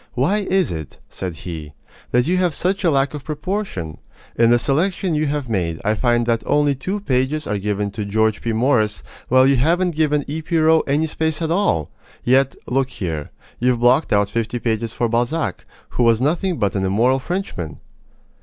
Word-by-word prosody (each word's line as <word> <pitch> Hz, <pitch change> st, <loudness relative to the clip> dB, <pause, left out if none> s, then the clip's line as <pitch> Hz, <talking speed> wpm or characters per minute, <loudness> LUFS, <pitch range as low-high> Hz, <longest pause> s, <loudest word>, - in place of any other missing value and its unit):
"Why 150 Hz, +12 st, +2 dB
is 190 Hz, -3 st, +1 dB
it," 80 Hz, -3 st, -6 dB
said 90 Hz, -3 st, -5 dB
he, 80 Hz, -3 st, -7 dB, 0.4 s
"that 125 Hz, 0 st, +2 dB
you 180 Hz, +3 st, +1 dB
have 180 Hz, -4 st, +1 dB
such 190 Hz, +3 st, -1 dB
a 175 Hz, -, +4 dB
lack 140 Hz, -1 st, +1 dB
of 145 Hz, -2 st, -6 dB
proportion? 150 Hz, -, -4 dB, 0.4 s
In 115 Hz, 0 st, +4 dB
the 120 Hz, -, +5 dB
selection 170 Hz, -, 0 dB
you 155 Hz, 0 st, +1 dB
have 145 Hz, -2 st, -2 dB
made 85 Hz, -7 st, -1 dB
I 105 Hz, -, +3 dB
find 120 Hz, +1 st, +1 dB
that 115 Hz, -1 st, +1 dB
only 145 Hz, -1 st, +3 dB
two 190 Hz, +10 st, -4 dB
pages 140 Hz, -1 st, 0 dB
are 105 Hz, -1 st, -2 dB
given 105 Hz, 0 st, -2 dB
to 105 Hz, +1 st, -4 dB
George 110 Hz, +1 st, +1 dB
P. 115 Hz, -, -1 dB
Morris, 110 Hz, -3 st, +1 dB, 0.2 s
while 130 Hz, +1 st, +5 dB
you 135 Hz, 0 st, +4 dB
haven't 175 Hz, +7 st, +2 dB
given 150 Hz, -2 st, +1 dB
E. 155 Hz, +3 st, -3 dB
P. 165 Hz, +1 st, -1 dB
Roe 160 Hz, 0 st, +5 dB
any 145 Hz, +3 st, +2 dB
space 160 Hz, 0 st, -1 dB
at 165 Hz, -1 st, -2 dB
all! 85 Hz, -, +1 dB, 0.3 s
Yet, 135 Hz, +2 st, +3 dB
look 135 Hz, +1 st, 0 dB
here 80 Hz, -, -4 dB, 0.3 s
you've 125 Hz, -1 st, +2 dB
blocked 125 Hz, +5 st, +3 dB
out 100 Hz, -1 st, +2 dB
fifty 115 Hz, +1 st, -2 dB
pages 115 Hz, -1 st, -1 dB
for 120 Hz, -, -1 dB
Balzac, 120 Hz, +8 st, -1 dB, 0.2 s
who -, -, -2 dB
was 115 Hz, -2 st, +4 dB
nothing 170 Hz, +6 st, 0 dB
but 100 Hz, -2 st, 0 dB
an 95 Hz, -, -1 dB
immoral 115 Hz, +8 st, +2 dB
Frenchman!" 130 Hz, -, -4 dB
130 Hz, 190 wpm, -20 LUFS, 110-155 Hz, 0.4 s, the